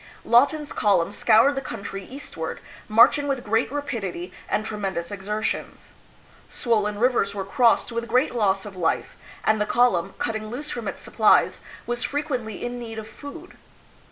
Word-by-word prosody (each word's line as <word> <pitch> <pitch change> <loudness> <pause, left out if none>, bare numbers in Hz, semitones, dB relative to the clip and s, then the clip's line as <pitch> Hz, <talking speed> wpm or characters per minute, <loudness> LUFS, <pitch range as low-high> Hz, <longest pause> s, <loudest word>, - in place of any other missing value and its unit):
Lawton's 285 +5 +3
column 195 -4 +2
scoured 225 +6 +4
the 270 - -3
country 200 -6 -6
eastward, 250 - -6 0.3
marching 235 +6 +5
with 270 -3 -1
great 225 +3 +1
rapidity 195 -11 -4 0.2
and 215 - 0
tremendous 195 -5 -3
exertions. 210 +2 -4 0.6
Swollen 210 -3 0
rivers 230 -4 +2
were 195 -1 -3
crossed 240 +2 +3
with 235 0 -3
great 250 +4 +2
loss 195 -4 +1
of 205 -2 -9
life, 170 -3 -1 0.3
and 215 -1 +2
the - - +2
column, 195 -7 +2
cutting 220 -1 -3
loose 285 +6 -5
from 235 -2 -4
its - - -5
supplies, - - +3 0.2
was 240 0 -2
frequently 255 -8 -3
in 245 0 -4
need 225 -2 -7
of 220 -1 -6
food. 295 +9 -10
225 Hz, 155 wpm, -24 LUFS, 200-250 Hz, 0.6 s, marching